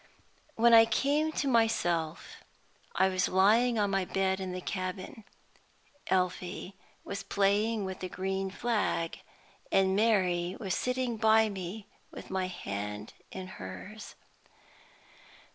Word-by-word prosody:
When 235 +1 +5
I 225 0 +9
came 285 +7 +1
to 285 - -1
myself 175 -10 0 0.6
I 190 +2 +4
was 185 -1 +1
lying 225 +6 +4
on 205 -2 +1
my 195 -1 +1
bed 190 +1 0
in 190 -1 -4
the 180 - -4
cabin. 185 +3 -5 0.8
Elfie 185 +1 -1 0.3
was 200 - -5
playing 205 +2 +1
with 190 -1 -5
the 185 - -5
green 190 +1 -2
flag, 205 -6 -1 0.5
and 190 0 +3
Mary 185 -5 +2
was 195 -6 -2
sitting 250 -2 -1
by 220 0 +4
me 195 +1 -6 0.2
with - - -10
my 190 -1 0
hand 105 - -5 0.2
in 190 -1 -6
hers. 185 - -9
195 Hz, 125 wpm, -30 LUFS, 185-220 Hz, 0.8 s, I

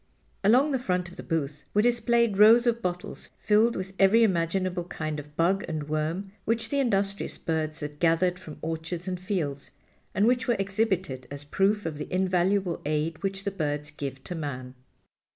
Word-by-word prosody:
Along 255 +9 +5
the 265 - +1
front 180 -6 -1
of 175 - -14
the - - -7
booth 150 -3 -3
were 210 - +4
displayed 235 -3 +2
rows 225 +3 +8
of 235 -1 +1
bottles 180 -2 -4
filled 220 +3 +3
with 190 +1 -5
every 200 +4 +6
imaginable 180 -1 0
kind 155 -3 -4
of 150 0 -12
bug 190 +4 +2
and 155 -2 -4
worm 160 +6 -2
which 225 0 0
the 280 - 0
industrious 200 -6 0
birds 155 -1 -2
had 150 0 -6
gathered 175 +2 +2
from 160 -4 -10
orchards 165 +2 -4
and 180 -1 -2
fields, 165 -7 -3 0.5
and 205 - +3
which 250 +2 +2
were 240 - +3
exhibited 190 - -1
as 145 0 -7
proof 195 +7 +1
of 155 -2 -4
the - - -6
invaluable 185 0 +1
aid 155 +2 -1
which 195 0 -2
the 200 - -1
birds 150 -4 -2
give 135 -3 -6
to - - -5
man. 130 -6 -5
180 Hz, 180 wpm, -27 LUFS, 155-205 Hz, 0.5 s, rows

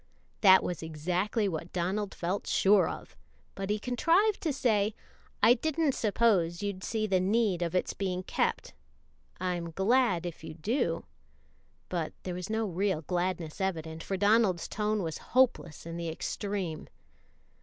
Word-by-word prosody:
That 190 -2 +7
was 175 - -3
exactly 180 +7 -1
what 165 -1 -4
Donald 190 +3 -2
felt 180 +4 -2
sure 195 0 +4
of, - - -8 0.4
but 195 0 -5
he 210 - +1
contrived 335 - +2
to 320 - 0
say, 215 -6 +1 0.5
"I 225 +3 +8
didn't 315 +4 0
suppose 205 -7 +1
you'd 200 -2 -3
see 220 -1 -1
the 190 -3 +2
need 200 -1 +1
of 170 0 -1
its 180 - 0
being 185 -2 -2
kept - - -1 0.7
I'm 175 -2 -2
glad 195 0 +2
if 170 -2 -6
you 160 - -7
do;" 170 - -1 0.8
but 170 -3 -3
there 180 - -4
was 180 +2 -5
no 220 0 0
real 190 -3 -1
gladness 175 -1 -2
evident, 165 -4 -2
for 195 - -3
Donald's 205 -3 +3
tone 210 -1 -1
was 160 -1 -4 0.2
hopeless 235 - +2
in 170 0 -6
the 170 -1 -3
extreme. 180 0 -4
190 Hz, 150 wpm, -30 LUFS, 170-215 Hz, 0.8 s, I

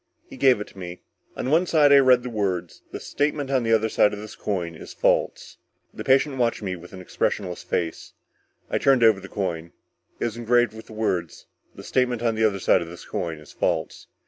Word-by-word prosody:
He - - -11
gave 130 -5 +4
it 105 - -4
to 95 - -15
me. 90 -1 -8 0.3
On 130 - -2
one 170 +4 +3
side 150 -4 +4
I 140 - +9
read 130 -2 +5
the 125 - -4
words: 95 -6 -2
THE - - -6
STATEMENT 145 -1 -2
ON 130 -2 +2
THE 115 -1 -1
OTHER 110 0 +3
SIDE 105 -1 +3
OF 105 - -5
THIS 105 0 -9
COIN 90 -5 -3
IS 80 - -11
FALSE. - - 0 0.3
The - - -7
patient 135 +1 +3
watched 115 -2 0
me 95 -2 -2
with 90 0 -13
an 95 - -9
expressionless 90 0 -2
face; 85 -2 -3 0.5
I - - -1
turned 135 -3 +4
over 110 -3 +5
the 95 0 -11
coin. 85 -4 -4 0.5
It - - -1
was 115 -1 -3
engraved 120 0 +2
with 110 0 -11
the - - -12
words: 95 -7 -2 0.3
THE - - -10
STATEMENT 125 -2 0
ON 115 -1 +2
THE 110 0 +1
OTHER 100 -3 +1
SIDE 90 - +3
OF 85 - -6
THIS 85 - -11
COIN 85 -6 -4
IS 75 -1 -14
FALSE. - - -2
110 Hz, 225 wpm, -24 LUFS, 90-125 Hz, 0.5 s, I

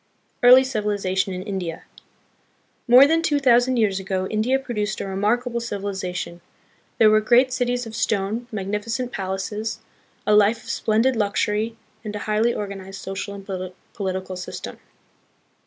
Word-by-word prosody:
Early 250 +2 +8
Civilization 205 -6 -1
in 185 0 -5
India. 185 -5 -4 1.0
More 250 +3 +9
than 325 +3 +2
two 295 -3 +1
thou 250 -4 +6
sand 250 +1 0
years 205 -4 +2
ago, 190 -1 -2
India 225 +5 +2
produced 215 -5 -3
a - - -3
remarkable 235 +5 0
civili 205 -4 -4
zation. 180 -2 -5 0.6
There 215 -1 +6
were 215 0 +4
great 250 +4 +4
cities 245 -1 -1
of 225 -1 -8
stone, 220 +4 -1
magnificent 215 +5 -3
palaces, 200 +2 -3 0.5
a 210 - +3
life 210 +2 +4
of - - -5
splendid 230 +4 +1
luxury, 215 +1 0 0.3
and 210 -1 -5
a - - -3
highly 215 +2 +2
organized 195 -2 -6
social 195 +1 -5
and 195 -1 -10 0.5
political 190 -2 -4
system. 180 - -7
215 Hz, 145 wpm, -23 LUFS, 195-240 Hz, 1.0 s, More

